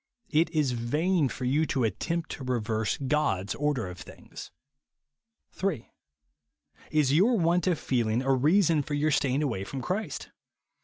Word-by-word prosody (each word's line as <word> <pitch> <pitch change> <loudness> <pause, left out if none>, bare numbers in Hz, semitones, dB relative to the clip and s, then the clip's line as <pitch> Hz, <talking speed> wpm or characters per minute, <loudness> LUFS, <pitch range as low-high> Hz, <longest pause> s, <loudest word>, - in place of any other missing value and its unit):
It 160 +2 +3
is 155 -5 +1
vain 150 +7 +1
for 125 - -5
you 150 +5 +2
to 130 - 0
attempt 160 - -2
to 135 - -6
reverse 115 -4 -1
God's 130 -9 0
order 145 -6 -1
of 90 0 -9
things. - - -11 1.0
3. 190 - -3 1.0
Is 150 -3 +2
your 215 +10 +4
luant 175 0 +2
of 170 - 0
feeling 120 -2 0
a 135 0 +2
reason 155 +4 +3
for 145 +1 -4
your 150 +2 +1
staying 140 0 +1
aiuay 115 -10 -1
from 135 -2 -5
Christ 195 - -3
145 Hz, 150 wpm, -28 LUFS, 125-160 Hz, 1.0 s, your